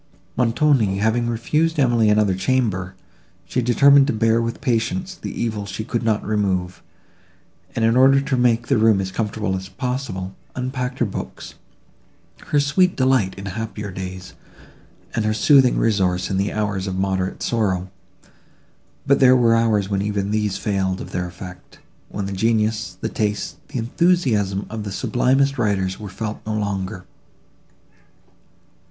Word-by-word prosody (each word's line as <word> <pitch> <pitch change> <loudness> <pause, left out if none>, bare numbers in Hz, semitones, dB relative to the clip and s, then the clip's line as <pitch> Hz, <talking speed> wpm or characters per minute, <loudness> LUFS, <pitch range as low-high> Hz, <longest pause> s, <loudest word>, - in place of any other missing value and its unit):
Montoni 120 -4 +2
having 110 +3 +1
refused 150 +8 0
Emily 120 -6 +3
another 105 -2 +3
chamber, 95 -4 -1 0.5
she 125 - -1
determined 140 +4 +5
to - - 0
bear 115 +1 +2
with 115 0 -3
patience 145 +10 -1
the - - -7
evil 110 -3 -2
she 105 +3 -5
could 120 +1 -2
not 110 -2 0
remove, 95 -4 -1 0.9
and, 115 - +1
in 115 +1 +3
order 135 +2 +6
to 135 0 -1
make 120 -2 +2
the 135 -3 +2
room 110 -2 +4
as 95 -1 -3
comfortable 105 -1 -2
as 95 0 -6
possible, 100 -4 -4 0.2
unpacked 130 0 -3
her 120 - +1
books, 100 - -7 0.9
her 145 - +2
sweet 180 +6 +2
delight 130 -7 +2
in 95 - -7
happier 105 0 -5
days, 90 0 -7 0.8
and 115 - 0
her 110 0 0
soothing 130 +2 +5
resource 95 -5 +1
in 95 - 0
the 100 +2 0
hours 105 -3 -2
of 95 - -3
moderate 95 -1 -1
sorrow: 95 -5 -1 1.1
but 140 0 +3
there 130 -1 +6
were 115 -2 +4
hours 110 -4 +2
when 100 -1 -1
even 100 -1 -2
these 105 -2 0
failed 95 -3 -1
of - - -8
their 90 -1 -2
effect; 90 0 -11 0.3
when 100 -1 -4
the 100 - -4
genius, 110 -1 0
the - - -1
taste, 105 -2 -2
the 145 - -6
enthusiasm 115 - +1
of 110 -1 -6
the 100 - -5
sublimest 135 +6 +1
writers 95 -4 0
were 105 -2 -7
felt 105 +3 -5
no 110 0 -3
longer. 100 -2 -3
110 Hz, 155 wpm, -21 LUFS, 95-125 Hz, 1.1 s, order